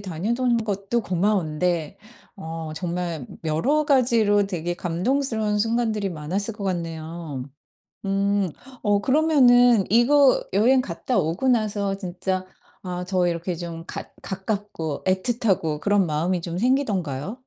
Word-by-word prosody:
다니던 230 Hz, +7 st, 0 dB
것도 200 Hz, +3 st, -1 dB
고마운데 175 Hz, -3 st, 0 dB, 0.4 s
어 160 Hz, -3 st, -6 dB
정말 170 Hz, -4 st, -3 dB, 0.2 s
여러 255 Hz, -, +1 dB
가지로 230 Hz, -7 st, +3 dB
되게 175 Hz, -3 st, -3 dB
감동스러운 210 Hz, +5 st, -1 dB
순간들이 225 Hz, -2 st, 0 dB
많았을 185 Hz, +6 st, -3 dB
것 205 Hz, -, -7 dB
같네요. 165 Hz, -5 st, -4 dB, 0.6 s
음 195 Hz, -2 st, +1 dB, 0.3 s
어 205 Hz, -2 st, +2 dB
그러면은 245 Hz, -4 st, +5 dB
이거 265 Hz, +4 st, +5 dB
여행 240 Hz, +7 st, +4 dB
갔다 240 Hz, +4 st, -2 dB
오고 170 Hz, +12 st, 0 dB
나서 205 Hz, -4 st, +1 dB
진짜 185 Hz, 0 st, -3 dB, 0.4 s
아 180 Hz, 0 st, -4 dB
저 185 Hz, -2 st, +2 dB
이렇게 170 Hz, +1 st, -2 dB
좀 165 Hz, -1 st, -6 dB
가 -, -, -6 dB, 0.2 s
가깝고 190 Hz, -6 st, -4 dB
애틋하고 190 Hz, -5 st, 0 dB
그런 200 Hz, -1 st, +2 dB
마음이 170 Hz, +4 st, 0 dB
좀 170 Hz, 0 st, -4 dB
생기던가요? 205 Hz, -, 0 dB
195 Hz, 270 characters per minute, -24 LUFS, 170-225 Hz, 0.6 s, 그러면은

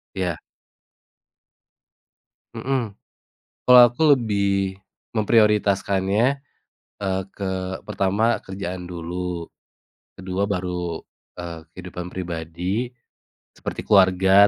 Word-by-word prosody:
Iya. 90 Hz, -4 st, -1 dB, 2.2 s
Mhm, 120 Hz, -1 st, -1 dB, 0.7 s
kalo 125 Hz, 0 st, +9 dB
aku 120 Hz, +6 st, -7 dB
lebih 100 Hz, -5 st, 0 dB, 0.4 s
memprioritaskannya, 105 Hz, +2 st, +3 dB, 0.7 s
eee, 95 Hz, -1 st, 0 dB
ke 95 Hz, -1 st, -3 dB
pertama 100 Hz, +5 st, +1 dB
kerjaan 95 Hz, -2 st, -6 dB
dulu, 90 Hz, 0 st, -4 dB, 0.7 s
ke-2 95 Hz, +1 st, -2 dB
baru, 90 Hz, -3 st, -2 dB, 0.4 s
eee, 85 Hz, -2 st, -6 dB
kehidupan 90 Hz, 0 st, -7 dB
pribadi, 90 Hz, +6 st, -3 dB, 0.6 s
seperti -, -, -6 dB
keluarga, 95 Hz, 0 st, +6 dB
95 Hz, 75 wpm, -23 LUFS, 90-105 Hz, 2.2 s, kalo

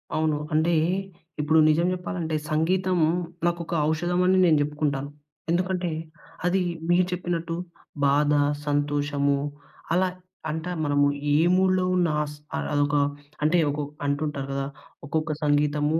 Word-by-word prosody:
అవును. 155 Hz, -1 st, +1 dB, 0.2 s
అంటే, 160 Hz, +2 st, +3 dB, 0.7 s
ఇప్పుడు 155 Hz, +2 st, +4 dB
నిజం 170 Hz, +3 st, +3 dB
జెప్పాలంటే, 175 Hz, -3 st, -3 dB, 0.2 s
సంగీతం 180 Hz, +4 st, +1 dB, 0.5 s
నాకొక 170 Hz, -1 st, -1 dB, 0.2 s
ఔషధమని 180 Hz, +3 st, +2 dB
నేను 155 Hz, -3 st, +5 dB
జెప్పుకుంటాను. 145 Hz, -1 st, -1 dB, 0.4 s
ఎందుకంటే, 180 Hz, 0 st, 0 dB, 0.5 s
అది 185 Hz, +1 st, +2 dB, 0.3 s
మీరు 175 Hz, +1 st, +4 dB
చెప్పినట్టు 170 Hz, -2 st, -2 dB, 0.5 s
బాధ, 145 Hz, +1 st, +3 dB, 0.3 s
సంతోషము 145 Hz, -1 st, +1 dB, 0.6 s
అలా. 185 Hz, +1 st, +3 dB, 0.4 s
అంటా 160 Hz, +3 st, -3 dB
మనము 145 Hz, -1 st, +3 dB, 0.2 s
ఏ -, -, +4 dB, 0.2 s
మూడ్‌లో 185 Hz, 0 st, +3 dB
ఉన్నా 175 Hz, -3 st, +2 dB, 0.2 s
స్ -, -, -10 dB, 0.2 s
అ -, -, -1 dB
అదొక 145 Hz, 0 st, +2 dB, 0.5 s
అంటే, 165 Hz, +4 st, +3 dB
ఒకొక్ 145 Hz, 0 st, -4 dB
అంటుంటారు 140 Hz, -1 st, -2 dB
గదా! 135 Hz, 0 st, -2 dB, 0.4 s
ఒక్కొక్క 155 Hz, +1 st, -1 dB
సంగీతము 150 Hz, +1 st, +2 dB
155 Hz, 115 wpm, -25 LUFS, 145-175 Hz, 0.7 s, నేను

